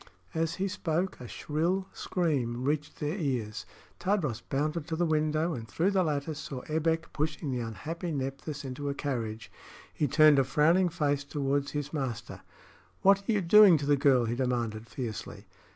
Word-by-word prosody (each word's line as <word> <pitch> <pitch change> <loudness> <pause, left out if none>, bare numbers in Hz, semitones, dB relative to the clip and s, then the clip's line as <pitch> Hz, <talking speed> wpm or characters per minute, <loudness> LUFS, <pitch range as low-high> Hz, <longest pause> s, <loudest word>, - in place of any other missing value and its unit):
As 165 +1 -1
he 195 +1 -1
spoke, 185 -2 -2
a 125 - -7
shrill 165 - -1
scream 130 -9 -1
reached 150 +2 -2
their 150 +6 -2
ears. 120 -8 -2 0.3
Tadros 175 - 0
bounded 150 +5 -2
to 165 - -2
the 175 +2 +1
window, 155 +1 +1
and 115 -5 -6
through 170 - +1
the 195 -2 +3
lattice 150 -2 -2
saw 135 -3 -6
Ebbek 160 +1 -1
pushing 155 -1 -2
the 125 - -1
unhappy 150 - -5
Nephthys 140 +1 -4
into 135 +2 -4
a 140 - -2
carriage. 115 -6 -4 0.4
He 150 - 0
turned 150 +1 +6
a - - +5
frowning 160 +7 +3
face 145 -3 0
toward 140 0 -1
his 145 0 -4
master. 130 -7 -4 0.6
"What 200 +1 +4
are - - +5
you 210 -2 +2
doing 190 0 +8
to 145 - -4
the 145 0 +4
girl?" 135 -4 +4
he 115 - -1
demanded, 120 -3 -2
fiercely. 115 -7 -6
150 Hz, 170 wpm, -29 LUFS, 130-165 Hz, 0.6 s, doing